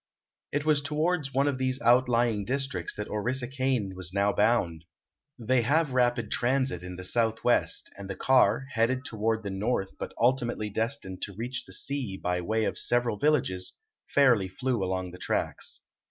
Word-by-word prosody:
It 145 Hz, +1 st, -1 dB
was 150 Hz, -2 st, +3 dB
toward 155 Hz, +2 st, 0 dB
one 135 Hz, +1 st, +1 dB
of 135 Hz, -2 st, -1 dB
these 130 Hz, 0 st, 0 dB
outlying 120 Hz, -3 st, +3 dB
districts 135 Hz, +4 st, -2 dB
that 105 Hz, -, -4 dB
Orissa 120 Hz, +4 st, -1 dB
Kane 130 Hz, -7 st, -1 dB
was 90 Hz, -2 st, -1 dB
now 100 Hz, +1 st, +2 dB
bound. 95 Hz, -7 st, +1 dB, 0.5 s
They 125 Hz, +1 st, +2 dB
have 145 Hz, +3 st, +1 dB
rapid 120 Hz, -3 st, +1 dB
transit 130 Hz, -7 st, +1 dB
in 90 Hz, 0 st, -7 dB
the 95 Hz, -, -8 dB
Southwest, 115 Hz, +4 st, +1 dB
and 100 Hz, -1 st, -8 dB
the 95 Hz, -, -3 dB
car, 130 Hz, -1 st, +3 dB
headed 125 Hz, +4 st, +1 dB
toward 110 Hz, 0 st, -1 dB
the 100 Hz, -, -4 dB
north 95 Hz, 0 st, -1 dB
but -, -, -6 dB
ultimately 120 Hz, -3 st, +1 dB
destined 110 Hz, -4 st, -3 dB
to 100 Hz, -, -5 dB
reach 120 Hz, +4 st, -4 dB
the -, -, -10 dB
sea 135 Hz, -9 st, -3 dB
by 90 Hz, -1 st, -1 dB
way 110 Hz, +5 st, 0 dB
of -, -, -1 dB
several 120 Hz, -3 st, +1 dB
villages, 95 Hz, -11 st, +1 dB, 0.3 s
fairly 125 Hz, -9 st, +4 dB
flew 120 Hz, +3 st, -2 dB
along 95 Hz, -1 st, -2 dB
the 90 Hz, -, -11 dB
tracks. -, -, -2 dB
120 Hz, 170 wpm, -28 LUFS, 100-130 Hz, 0.5 s, fairly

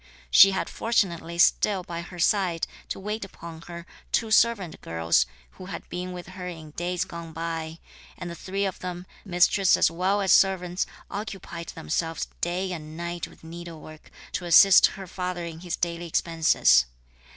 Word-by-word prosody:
She 195 Hz, -, +9 dB
had 190 Hz, -, -2 dB
fortunately 170 Hz, -7 st, -1 dB
still 190 Hz, +2 st, +3 dB
by 170 Hz, -1 st, -5 dB
her 175 Hz, +1 st, -10 dB
side, 175 Hz, -2 st, +1 dB, 0.2 s
to -, -, -4 dB
wait 210 Hz, +2 st, -4 dB
upon 170 Hz, -4 st, -10 dB
her, 170 Hz, -1 st, -8 dB, 0.3 s
two 225 Hz, -2 st, 0 dB
servant 215 Hz, -7 st, +2 dB
girls, 80 Hz, -7 st, +1 dB, 0.2 s
who 185 Hz, -, -11 dB
had 195 Hz, -, -7 dB
been 180 Hz, +1 st, -4 dB
with 180 Hz, 0 st, -8 dB
her 185 Hz, -1 st, -7 dB
in 160 Hz, -3 st, -8 dB
days 175 Hz, +2 st, -2 dB
gone 170 Hz, -1 st, -8 dB
by; 165 Hz, -1 st, -4 dB, 0.4 s
and 180 Hz, -, -6 dB
the 170 Hz, -, -5 dB
three 195 Hz, +3 st, -3 dB
of 190 Hz, -, -4 dB
them, 180 Hz, 0 st, -6 dB, 0.2 s
mistress 185 Hz, +1 st, +3 dB
as -, -, +3 dB
well 185 Hz, +4 st, +1 dB
as 190 Hz, -3 st, +2 dB
servants, 185 Hz, -2 st, +3 dB, 0.2 s
occupied 195 Hz, -5 st, -6 dB
themselves 165 Hz, -, -3 dB
day 180 Hz, +2 st, -1 dB
and 155 Hz, -2 st, -7 dB
night 170 Hz, 0 st, -4 dB
with -, -, -19 dB
needlework, 160 Hz, -2 st, -10 dB, 0.2 s
to 180 Hz, -, -3 dB
assist 190 Hz, +3 st, +8 dB
her 195 Hz, -, -7 dB
father 180 Hz, -1 st, -4 dB
in 165 Hz, -1 st, -7 dB
his 175 Hz, 0 st, -3 dB
daily 170 Hz, 0 st, -3 dB
expenses. 160 Hz, -, +3 dB
175 Hz, 165 wpm, -26 LUFS, 165-190 Hz, 0.4 s, She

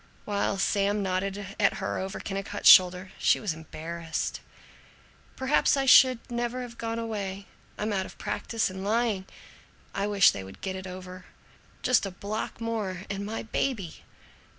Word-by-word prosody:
While 200 Hz, -1 st, 0 dB
Sam 200 Hz, +1 st, +1 dB
nodded 195 Hz, +2 st, -2 dB
at 200 Hz, -, +3 dB
her -, -, -3 dB
over 190 Hz, +2 st, -4 dB
Kennicott's 195 Hz, +1 st, -3 dB
shoulder, 185 Hz, +1 st, +7 dB
she -, -, +4 dB
was 205 Hz, -7 st, -2 dB
embarrassed. 165 Hz, +1 st, -5 dB, 0.9 s
"Perhaps 270 Hz, +2 st, +2 dB
I 270 Hz, -, +1 dB
should 255 Hz, -1 st, +8 dB
never 240 Hz, +1 st, -2 dB
have 235 Hz, -1 st, -10 dB
gone 230 Hz, 0 st, -3 dB
away. 200 Hz, -4 st, -4 dB, 0.3 s
I'm 210 Hz, 0 st, -2 dB
out 190 Hz, -1 st, -1 dB
of -, -, -14 dB
practise 225 Hz, -4 st, -2 dB
in 190 Hz, 0 st, -7 dB
lying. 215 Hz, -2 st, 0 dB, 0.7 s
I 200 Hz, -, -1 dB
wish 200 Hz, -1 st, +6 dB
they 95 Hz, -, -6 dB
would 95 Hz, 0 st, -12 dB
get 190 Hz, -1 st, -3 dB
it 190 Hz, 0 st, -6 dB
over! 185 Hz, 0 st, -9 dB, 0.6 s
Just 250 Hz, -5 st, +3 dB
a -, -, -4 dB
block 205 Hz, +5 st, -5 dB
more 215 Hz, -6 st, -3 dB
and 200 Hz, 0 st, -3 dB
my 215 Hz, +2 st, -4 dB
baby!" 220 Hz, -6 st, -2 dB
200 Hz, 155 wpm, -28 LUFS, 185-225 Hz, 0.9 s, should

